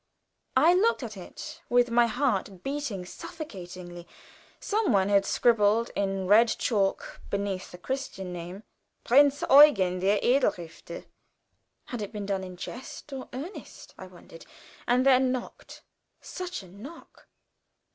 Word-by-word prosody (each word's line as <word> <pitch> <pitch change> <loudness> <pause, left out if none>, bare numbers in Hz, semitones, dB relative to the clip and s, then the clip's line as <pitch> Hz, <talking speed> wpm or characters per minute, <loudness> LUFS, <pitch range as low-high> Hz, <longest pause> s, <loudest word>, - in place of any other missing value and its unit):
I 320 +6 +6
looked 405 - +2
at 220 -2 -6
it 300 - -10
with 245 0 +3
my 240 0 +4
heart 215 -7 -1
beating 270 -10 -4
suffocatingly. 180 - -9 0.5
Some 425 - 0
one 195 -2 +2
had 200 -1 +3
scribbled 230 -1 +2
in 195 -1 -1
red 215 +5 +6
chalk 205 -4 -1
beneath 200 -2 -3
the 180 - -11
Christian 195 -5 -5
name, 175 +4 -8 0.4
"Prinz 285 +3 +4
Eugen, 205 -11 +6
der 195 +3 +2
edle 265 +3 +3
Ritter." 170 -1 -10 0.8
Had 245 -3 -6
it 205 0 -5
been 210 -2 -5
done 195 -1 -2
in 185 -1 -9
jest 260 +7 -9
or 265 -1 -7
earnest? 305 +10 -9
I 185 - -10
wondered, 175 -2 -15 0.4
and 250 +2 +3
then 260 -1 +4
knocked. 255 -1 -7 0.4
Such 360 - -6
a - - -14
knock! 225 - -13
220 Hz, 135 wpm, -27 LUFS, 190-270 Hz, 0.8 s, I